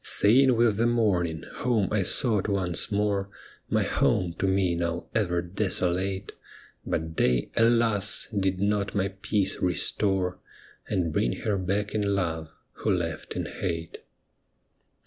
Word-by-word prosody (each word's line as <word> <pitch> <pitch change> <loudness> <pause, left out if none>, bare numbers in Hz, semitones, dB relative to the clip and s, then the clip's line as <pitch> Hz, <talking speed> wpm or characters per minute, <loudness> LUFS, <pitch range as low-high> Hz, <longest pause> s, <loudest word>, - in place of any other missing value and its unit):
Sane 125 +4 +6
with 115 -3 +2
the 115 +2 +2
morning, 90 -9 0
home 115 -6 +1
I 105 -1 +1
sought 105 +1 +1
once 95 -3 0
more, 100 -1 0 0.4
My - - +2
home 90 -2 +1
to 95 - +1
me 95 -2 +1
now 85 0 -2
ever 90 -6 0
desolate; 95 0 -1 0.5
But 80 0 -3
day, 60 -1 +1
alas 115 -3 +3
1 100 -3 -1
did 95 -1 0
not 100 0 0
my 100 -1 +1
peace 100 0 -1
restore, 90 +1 0 0.5
And 85 -4 -1
bring - - +1
her 105 -2 0
back 100 +3 -2
in 100 -2 0
love, 80 -4 -2 0.2
who - - -4
left 85 -5 -2
in - - -2
hate. 85 0 -5
95 Hz, 140 wpm, -26 LUFS, 90-105 Hz, 0.5 s, Sane